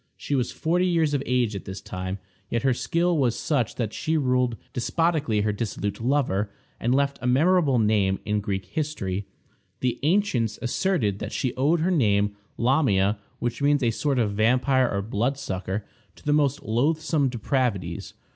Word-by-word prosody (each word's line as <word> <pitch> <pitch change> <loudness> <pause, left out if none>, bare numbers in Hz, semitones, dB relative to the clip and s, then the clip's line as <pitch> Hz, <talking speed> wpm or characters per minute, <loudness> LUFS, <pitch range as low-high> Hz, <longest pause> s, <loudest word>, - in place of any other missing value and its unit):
She - - -4
was 125 -3 +1
forty 175 +3 +1
years 165 -4 +2
of 140 - +1
age 120 -4 +1
at 100 - -6
this 95 0 -6
time, 95 0 -5 0.3
yet 115 - -1
her 135 -1 +3
skill 170 +7 +1
was 120 -4 +1
such 125 -8 0
that 110 -3 -2
she 160 0 0
ruled 125 -4 +1 0.2
despotically 145 -4 +1
her 105 0 0
dissolute 105 -1 -3
lover, 115 -6 +1 0.3
and 120 +3 +1
left 140 0 +1
a 125 - -2
memorable 150 +1 +4
name 105 -3 +2
in 105 0 0
Greek 100 -2 -3
history. 100 - -3 0.5
The 125 -1 0
ancients 145 - +1
asserted 120 - 0
that - - -5
she 130 -4 -1
owed 150 +6 +2
her 180 +3 +2
name, 105 - +2 0.2
Lamia, 110 -6 +2 0.2
which 120 +3 -3
means 145 -1 +3
a 115 - +3
sort 140 +4 0
of 110 -4 +2
vampire 125 +4 +3
or 100 0 -1
bloodsucker, 105 -4 -2 0.3
to - - -19
the 145 - +2
most 145 -2 +2
loathsome 145 +4 +1
depravities. 115 -8 -2
125 Hz, 165 wpm, -25 LUFS, 105-145 Hz, 0.5 s, memorable